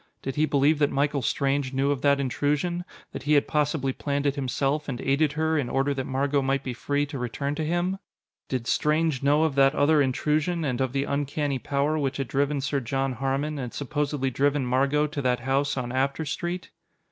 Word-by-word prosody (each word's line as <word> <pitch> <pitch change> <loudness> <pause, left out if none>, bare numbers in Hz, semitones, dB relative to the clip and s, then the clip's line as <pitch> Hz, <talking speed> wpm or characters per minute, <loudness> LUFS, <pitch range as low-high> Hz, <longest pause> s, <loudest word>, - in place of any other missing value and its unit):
Did 135 - -3
he 155 +1 +2
believe 145 +2 +3
that 145 -1 +3
Michael 140 0 0
Strange 135 +2 0
knew 135 +2 +1
of 140 -2 -2
that 140 0 +3
intrusion 145 +6 -1 0.3
that - - -6
he 145 +3 +1
had 145 - +4
possibly 150 -3 0
planned 140 +1 -2
it 140 - +2
himself, 140 +2 -1
and 125 -2 -3
aided 140 +2 +1
her, 160 0 +1
in 125 -4 -2
order 135 +2 +1
that 135 -1 -4
Margot 140 +2 +1
might 135 +1 0
be 130 - -3
free 145 +4 -1
to 140 -2 -6
return 140 +4 -2
to 155 +1 -3
him? 175 +4 -1 0.5
Did 130 -3 -2
Strange 150 +1 +1
know 145 +3 +3
of 160 -3 +1
that 135 +1 +4
other 150 +1 +4
intrusion, 150 +5 0
and 130 -2 -1
of 130 -1 -1
the 135 0 +1
uncanny 145 -1 -1
power 145 +4 0
which 135 -2 -1
had 135 -2 -2
driven 140 +1 0
Sir 140 +1 0
John 135 +1 -1
Harmon, 135 +4 -2
and 125 -3 -5
supposedly 145 -1 -1
driven 140 +1 +1
Margot 135 +4 +2
to 150 -1 -4
that 125 -2 +1
house 135 +3 0
on 120 -1 -3
After 135 +4 0
Street? 175 +5 -4
140 Hz, 205 wpm, -26 LUFS, 135-150 Hz, 0.5 s, had